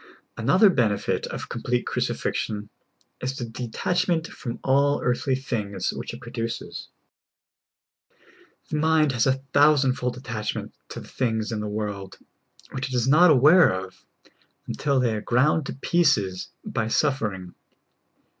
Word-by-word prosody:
Another 210 -3 +4
benefit 110 - 0
of - - -6
complete 125 0 -2
crucifixion 105 -1 -2 0.5
2s 130 +1 -3
the 120 - -3
de 120 +2 -6
tachment 175 +6 0
from 120 -6 -6
all 140 +2 +3
earthly 125 +2 0
things 105 -7 -3
which - - -6
it - - -9
produces. 115 +1 -5 1.8
The 155 - 0
mind 155 -1 +3
has 120 0 +1
a 130 - +4 0.2
thousand 145 -2 +5
fold 125 -1 -3
attachment 110 -4 -4 0.2
to - - -7
the - - -12
things 110 -3 -1
in 110 - -2
this 105 - -3
world, 105 -2 -5 0.5
which 135 0 -3
it 130 - -4
is 120 0 +1
not 170 +6 +6
aware 155 +5 +6
of 95 0 -6 0.6
until 140 -2 0
they 120 -3 +1
are 105 - -3
ground 135 +6 +2
to - - -4
pieces 130 - +1 0.2
by 110 - -2
suffering. 110 -9 -1
125 Hz, 140 wpm, -25 LUFS, 110-145 Hz, 1.8 s, not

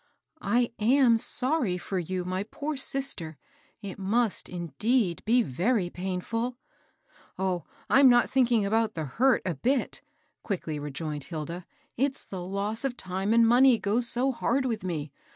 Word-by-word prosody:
" 315 - -38 0.2
I 245 -1 +2
am 235 +1 +4
sorry 250 - 0
for 185 +1 -3
you, 180 +1 -3
my 185 +1 -2
poor 290 +8 -5
sister. 265 - -1 0.5
It 200 -1 -7
must, 215 +3 0
indeed, 180 - -1
be 240 +2 +4
very 180 - 0
painftd." 190 +7 -3 0.4
" - - -46 0.3
Oh, 185 -2 -1 0.2
I'm 270 -1 +6
not 240 0 +5
thinking 240 -5 +2
about 220 +1 +1
the 160 -2 -3
hurt 250 - +2
a 180 - 0
bit," 250 - -1 0.4
quickly 165 -7 -3
rejoined 150 0 -5
Hilda. 165 +2 -6 0.3
It's 270 +2 -1
the 190 -2 -6
loss 200 +5 -2
of 260 -3 -2
time 190 +2 -3
#nd 230 +1 +5
money 250 +1 +6
goes 230 +4 +1
so 255 +3 +1
hard 265 +2 0
with 225 -6 -2
me. 155 -5 -4
210 Hz, 155 wpm, -27 LUFS, 180-245 Hz, 0.5 s, I'm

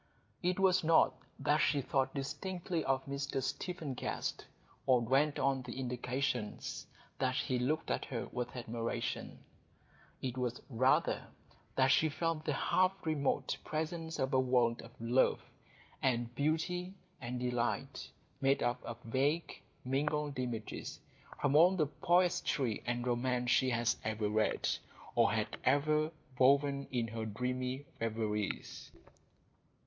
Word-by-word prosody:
It 180 +1 0
was 185 -2 +4
not 160 0 +5 0.2
that 150 +1 +2
she 145 - +3
thought 135 0 0
distinctly 170 +4 -3
of 135 0 +1
Mr 140 0 -2
Stephen 160 +1 -3
Guest, 125 - -3 0.4
or 130 -2 +6
dwelt 140 +5 +2
on 135 0 +1
the 125 +1 -7
indications 125 -2 -2 0.3
that 130 -1 +1
he 130 -1 0
looked 150 +6 0
at - - -1
her 120 -4 -3
with 125 0 -4
admiration; 115 -1 -3 0.8
it 130 -1 -3
was 125 -1 -1
rather 130 +3 +2 0.5
that 130 0 +4
she 155 +3 +4
felt 160 +1 -1
the 150 - +1
half 185 +6 +3
remote 150 -4 0
presence 160 +1 -3
of 130 +1 -1
a 130 - +5
world 125 -2 +2
of 115 - -11
love 120 +3 +3 0.6
and 120 -2 +1
beauty 165 +7 -1 0.3
and 125 0 -3
delight, 125 +2 -2 0.3
made 135 0 +3
up 120 0 0
of 120 - -6
vague, 140 +8 0 0.2
mingled 145 +1 0
images 120 -4 -4 0.4
from 145 -1 +2
all 175 +5 +7
the 160 -4 +3
poetry 170 - +1
and 120 0 -1
romance 125 0 +1
she 130 - +4
had 120 -1 +2
ever 110 -1 -1
read, 110 +1 +1 0.5
or - - +4
had - - -1
ever 150 +3 +3 0.3
woven 140 +1 +4
in 120 -3 0
her 115 0 -4
dreamy 125 +4 -2
reveries. 110 -2 -2
130 Hz, 135 wpm, -34 LUFS, 120-150 Hz, 0.8 s, all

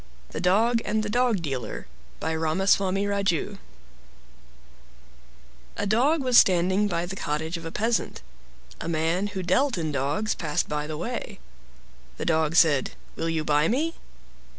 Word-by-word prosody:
THE - - -4
DOG 225 +6 +3
AND 215 0 0
THE 210 - -3
DOG 240 -6 +1
DEALER 130 -7 -4 0.3
By 160 +1 -2
Ramaswami 190 +4 +1
Raju 200 -5 -1 2.2
A - - -1
dog 265 +9 +2
was 250 -2 +7
standing 185 +3 +3
by 170 -3 -1
the 190 +2 -6
cottage 160 -1 -3
of 165 -1 -7
a - - -6
peasant. 225 - -1 0.6
A 165 - -4
man 165 +4 0
who 190 -2 -5
dealt 250 +8 +2
in 160 -2 -2
dogs 145 +10 -1
passed 150 -3 -2
by 150 0 -3
the 155 -1 -5
way. - - -5 0.8
The - - -4
Dog 160 -1 +1
said, 150 -6 +4 0.2
"Will 165 - -2
you 160 -1 -1
buy 150 +1 +2
me?" 310 - 0
180 Hz, 150 wpm, -26 LUFS, 160-210 Hz, 2.2 s, was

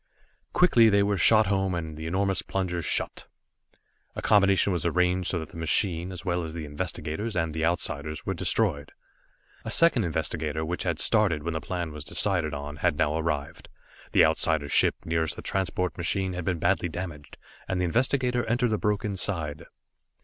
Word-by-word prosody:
Quickly 120 -11 +5
they 100 -1 +4
were 100 0 +1
shot 110 +4 +5
home, 95 -2 0
and 80 -2 -5
the 80 +1 -6
enormous 95 +3 0
plungers 90 -4 -3
shut. - - -2 0.9
A - - -4
combination 100 -1 +4
was 85 - -2
arranged 90 +1 +1
so 90 - 0
that 80 -2 -6
the - - -12
machine, 85 +2 0
as 90 -1 -8
well 90 -1 0
as 80 0 -6
the 80 -2 -5
investigator 80 +5 -4
and 80 -2 -1
the 80 0 -2
Outsiders, 75 -3 -2
were - - -1
destroyed. 80 -10 0 0.7
A - - -5
second 165 -9 +4
investigator, 80 -2 -2
which 90 +3 -3
had 85 -3 -1
started 95 -9 +2
when 85 +1 -2
the 80 - -3
plan 85 -2 -4
was 75 -1 -8
decided 85 0 +1
on, 75 +1 -6
had - - +1
now 75 - +1
arrived. 75 -3 -3 0.4
The - - +6
Outsider's 75 -3 +1
ship - - +4
nearest 80 -1 0
the - - -9
transport 90 -1 -1
machine 95 +2 -1
had 90 -1 -5
been 90 -1 0
badly 90 +1 +1
damaged, 80 -4 -7 0.3
and 95 - -1
the 90 - +1
investigator 125 +4 +1
entered 120 0 +1
the 110 - 0
broken 105 -1 -1
side. 80 -4 -2
85 Hz, 180 wpm, -27 LUFS, 80-100 Hz, 0.9 s, The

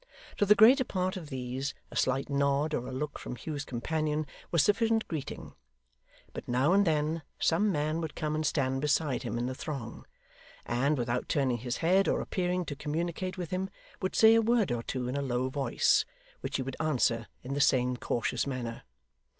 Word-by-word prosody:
To 205 - +2
the 210 - +7
greater 245 +6 +7
part 185 -5 -2
of 165 -6 -7
these, 130 +1 -4 0.2
a - - -10
slight 135 +1 +1
nod 140 +2 +1
or 125 - -2
a - - -5
look 145 +3 -4
from 125 - -6
Hugh's 145 +4 -5
companion 155 +4 -1 0.2
was 170 -4 +3
sufficient 225 +3 +2
greeting; 155 -5 -6 0.8
but, - - -7
now 130 +7 +3
and 200 -1 +4
then, 155 +1 +1 0.2
some 205 +6 +2
man 155 0 0
would 160 -2 -5
come 155 -2 -2
and 155 0 -1
stand 135 -3 0
beside 150 -2 +1
him 120 -1 -3
in 120 - -1
the 130 - -2
throng, 130 -4 -6 0.6
and, 135 +5 +1
without 120 0 -2
turning 130 -4 +1
his 120 +2 -3
head 190 +3 +4
or - - +2
appearing 180 -1 -1
to 145 - -5
communicate 170 +5 -3
with 175 -3 -5
him, 185 +1 -1 0.3
would 185 - -2
say 220 0 +7
a 225 - +5
word 225 - +2
or 120 -1 -1
two 125 +1 -3
in 125 - -3
a 140 - 0
low 130 -1 -1
voice, 135 +1 +2 0.4
which - - -4
he 130 - 0
would 135 0 -6
answer 125 -7 +1 0.2
in 130 +2 -4
the 140 - 0
same 125 -2 +3
cautious 120 +1 -1
manner. 120 -4 -4
145 Hz, 195 wpm, -30 LUFS, 130-175 Hz, 0.8 s, the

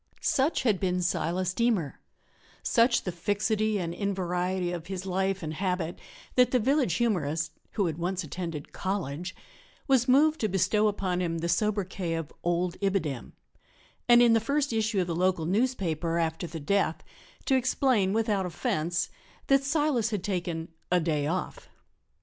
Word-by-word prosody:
Such 280 +3 +1
had 215 -7 +2
been 180 -1 0
Silas 180 +1 0
Deemer 220 - 0 0.6
such 235 +1 +3
the 180 - -2
fixity 210 +4 0
and 170 -3 -3
invariety 180 -2 -1
of 170 -1 -5
his 190 -1 -5
life 190 0 -1
and 155 0 -3
habit, 180 -1 -2 0.3
that 250 -1 +5
the 255 - +3
village 255 - +2
humorist 165 -9 0 0.2
(who 205 - +1
had 160 -1 -2
once 180 +2 -1
attended 165 -1 -6
college) 180 -2 -3 0.5
was 260 -4 +3
moved 300 +5 +4
to 215 - +1
bestow 210 +3 +2
upon 190 -3 -1
him 165 -2 -1
the 165 +1 -2
sobriquet 185 -2 0
of 165 -2 -5
"Old 175 +1 0
Ibidem," 185 -10 -1 0.8
and, 240 0 +8
in 235 -1 +6
the 225 - +5
first 280 +3 0
issue 215 -3 +1
of - - 0
the 170 -1 -3
local 180 -2 +1
newspaper 175 -6 0
after 165 +2 -1
the 165 - -6
death, 165 +1 0 0.4
to - - +2
explain 255 -6 +2
without 210 -3 +1
offence 170 +1 -1 0.4
that 275 0 +5
Silas 280 -6 +1
had 205 -5 -3
taken 175 -4 -3 0.2
"a 180 - +4
day 155 -3 0
off." 185 - -4
185 Hz, 155 wpm, -28 LUFS, 170-220 Hz, 0.8 s, and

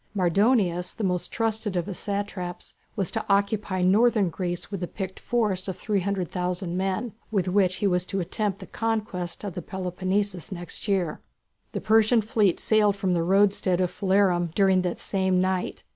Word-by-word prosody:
Mardonius, 185 -1 +2
the 225 - -5
most 180 -2 -1
trusted 220 -3 -1
of 175 - 0
his 195 -2 -5
satraps, 200 -3 -4 0.2
was 195 -5 -1
to - - -2
occupy 200 -1 +1
northern 210 +1 +4
Greece 175 +2 -4
with 195 -3 -4
a 175 - -2
picked 190 0 -6
force 210 -6 0
of 190 - -4
300,000 180 -3 -2
men, 190 +4 -1 0.2
with 195 -4 0
which 185 -1 +2
he - - -2
was 180 -2 +2
to 195 - -2
attempt 195 +2 -2
the - - -7
conquest 215 -6 -3
of 200 -3 -4
the 180 - -5
Peloponnesus 185 +1 -2
next 175 +2 -6
year. 190 -5 0 0.5
The - - -3
Persian 220 +2 +4
fleet 210 -4 +2
sailed 210 -2 +3
from 195 -2 0
the 170 - +1
roadstead 195 0 +3
of 180 -1 +1
Phalerum 190 -3 +2
during 190 -2 +4
that 180 -1 -2
same 190 -2 0
night. 185 0 -1
190 Hz, 170 wpm, -26 LUFS, 180-205 Hz, 0.5 s, northern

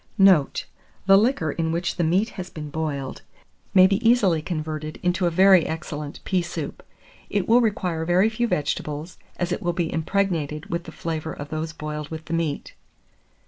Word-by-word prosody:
Note. 190 -8 +4 0.4
The 195 0 +7
liquor 200 - +2
in 160 +1 -1
which 170 +2 -2
the 175 - +1
meat 185 +8 +2
has 185 -4 -7
been 150 -2 -7
boiled 145 -4 -3 0.5
may 185 -1 +9
be 195 +4 +1
easily 195 -10 +3
converted 155 -2 -4
into 180 0 +1
a - - +3
very 185 0 +5
excellent 150 -2 -5
pea 185 -2 +1
soup. 170 -3 -5 0.5
It 200 -3 0
will 235 +2 +6
require 180 -7 0
very 175 +5 +3
few 230 +2 0
vegetables, 150 -1 -3 0.2
as 175 0 -2
it 180 - -2
will 175 -3 0
be 170 -1 -2
impregnated 160 -4 -1
with 170 0 -2
the 160 - -8
flavour 160 -1 -4
of 145 0 -8
those 155 +1 -3
boiled 150 -1 -6
with 160 -1 -7
the 165 - -5
meat. 165 -3 -2
165 Hz, 180 wpm, -24 LUFS, 155-190 Hz, 0.5 s, may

